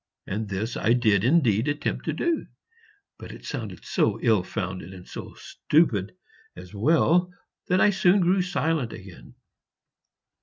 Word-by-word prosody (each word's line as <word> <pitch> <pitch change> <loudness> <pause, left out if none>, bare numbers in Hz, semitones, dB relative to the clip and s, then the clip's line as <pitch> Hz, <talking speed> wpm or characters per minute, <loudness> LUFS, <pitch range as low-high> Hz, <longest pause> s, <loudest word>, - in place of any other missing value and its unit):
And 105 +1 -4
this 105 +5 -3
I 115 - +2
did 110 -5 +2
indeed 125 -4 +3
attempt 145 0 -2
to - - -1
do, 340 -2 -1 0.7
but - - -9
it - - -12
sounded - - -6
so - - 0
ill 110 -5 +4
founded 95 -1 -5
and 90 -1 -13
so - - -9
stupid 110 - 0 0.4
as 90 +1 -12
well 165 - +2 0.4
that 185 +1 +2
I 210 - +5
soon 190 0 +3
grew 185 +2 +3
silent 165 - -1
again. 90 -11 -12
120 Hz, 145 wpm, -25 LUFS, -, 0.7 s, I